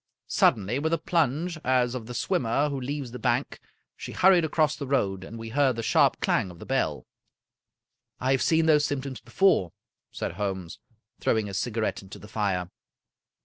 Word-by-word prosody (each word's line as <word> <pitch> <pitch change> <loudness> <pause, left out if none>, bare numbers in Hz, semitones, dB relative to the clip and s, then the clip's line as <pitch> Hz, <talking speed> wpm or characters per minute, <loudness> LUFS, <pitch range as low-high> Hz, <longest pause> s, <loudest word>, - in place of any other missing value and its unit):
Suddenly, 110 +5 +2
with 160 +2 0
a - - +3
plunge, 165 -1 0
as 125 -1 +2
of 120 -4 -6
the 125 - -7
swimmer 125 +5 0
who 140 -2 -4
leaves 135 -1 -4
the 125 - -7
bank, 125 +2 -1 0.4
she - - -8
hurried 185 -2 +5
across 155 -1 +1
the 140 - -6
road, 100 -9 0
and 115 +4 -9
we 115 0 -7
heard 135 0 +2
the 115 - -4
sharp - - +3
clang 95 - +1
of 90 - -12
the - - -10
bell. - - -1 0.6
" - - -57
I 130 +1 0
have 135 - +2
seen 160 0 +3
those 150 -2 +4
symptoms 140 -2 -3
before," 190 - +2 0.4
said - - -4
Holmes, 95 -3 -4 0.4
throwing 110 -2 +1
his 100 -2 -3
cigarette 115 -1 -2
into 95 -1 -11
the 105 - -12
fire. 100 -5 -2
125 Hz, 185 wpm, -27 LUFS, 105-145 Hz, 0.6 s, hurried